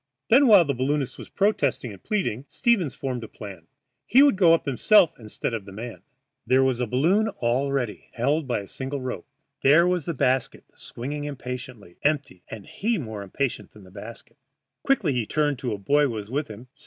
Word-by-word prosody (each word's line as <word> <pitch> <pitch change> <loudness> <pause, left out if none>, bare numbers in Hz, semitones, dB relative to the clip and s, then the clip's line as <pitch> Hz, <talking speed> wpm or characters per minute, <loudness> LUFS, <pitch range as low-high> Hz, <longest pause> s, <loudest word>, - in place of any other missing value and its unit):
Then, 265 +4 +6
while 200 -6 +7
the 140 - 0
balloonist 135 +1 -1
was - - -9
protesting 150 - 0
and 95 - -14
pleading, 160 - -2
Stevens 220 - +1
formed 130 -3 -4
his 110 - -8
plan. 95 -6 -10 0.4
He 260 +5 +6
would 285 -7 +5
go 180 -4 +5
up 165 - +3
himself 170 - +4
instead 110 +1 -4
of 110 -4 -4
the 100 - -10
man. 115 +4 -8 0.5
There 130 +1 +4
was 130 -2 +1
the 125 - -1
balloon 170 - +2
all 125 +4 0
ready, 125 -6 -3
held 140 +5 0
by 120 -5 -1
a 100 - -11
single 135 +5 -4
rope. 130 -9 -5 0.3
There 155 +6 +5
was 180 -4 0
the 170 - -3
basket 130 -1 0
swinging 145 +5 -6
impatiently, 125 -8 -7
empty, 145 - -1
and 105 -3 -8
he 225 +2 -1
more 110 - -6
impatient 120 +7 -3
than 105 - -15
the 95 - -16
basket. 110 +8 -11 0.4
Quickly 200 - +1
he 120 -4 -1
turned 145 -4 0
to 125 -3 -3
a 105 - -2
boy 145 +9 +2
who - - 0
was 110 -2 -6
with 145 +3 -1
him. 110 +3 -10
130 Hz, 200 wpm, -25 LUFS, 115-155 Hz, 0.5 s, while